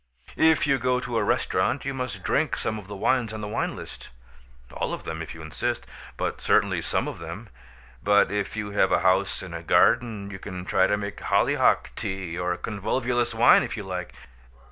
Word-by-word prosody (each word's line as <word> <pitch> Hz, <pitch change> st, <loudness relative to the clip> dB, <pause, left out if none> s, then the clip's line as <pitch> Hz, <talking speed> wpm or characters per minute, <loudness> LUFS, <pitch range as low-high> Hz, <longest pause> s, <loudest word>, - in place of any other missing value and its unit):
If 160 Hz, -1 st, +4 dB
you 140 Hz, -2 st, +2 dB
go 125 Hz, 0 st, +1 dB
to 125 Hz, -2 st, -3 dB
a -, -, +1 dB
restaurant 130 Hz, +2 st, 0 dB
you 140 Hz, -, -2 dB
must 125 Hz, -7 st, -4 dB
drink -, -, +1 dB
some 110 Hz, 0 st, -2 dB
of 95 Hz, -, -12 dB
the 100 Hz, -, -7 dB
wines 115 Hz, +2 st, +1 dB
on 110 Hz, -, -5 dB
the 105 Hz, -, -4 dB
wine 105 Hz, -, -2 dB
list, -, -, -10 dB, 0.6 s
all -, -, -2 dB
of -, -, -12 dB
them 80 Hz, 0 st, -5 dB
if 80 Hz, -, -7 dB
you 80 Hz, -, -10 dB
insist, 80 Hz, -, -3 dB, 0.3 s
but -, -, -3 dB
certainly -, -, +2 dB
some -, -, -1 dB
of -, -, -6 dB
them. 85 Hz, +7 st, -8 dB, 0.5 s
But 100 Hz, 0 st, +4 dB
if 105 Hz, 0 st, -2 dB
you 105 Hz, -1 st, -3 dB
have 100 Hz, -1 st, +2 dB
a -, -, +3 dB
house 95 Hz, +1 st, +2 dB
and 85 Hz, -2 st, -7 dB
garden 105 Hz, -5 st, +3 dB
you 95 Hz, -, -7 dB
can 90 Hz, -2 st, -7 dB
try 95 Hz, -, +3 dB
to 105 Hz, -, +1 dB
make 100 Hz, -2 st, -5 dB
hollyhock -, -, +2 dB
tea 95 Hz, -3 st, -4 dB
or 90 Hz, 0 st, -1 dB
convolvulus 120 Hz, +3 st, -1 dB
wine 115 Hz, -, +7 dB
if -, -, -4 dB
you 105 Hz, -, -4 dB
like. 90 Hz, -2 st, -5 dB
100 Hz, 200 wpm, -25 LUFS, 95-120 Hz, 0.6 s, wine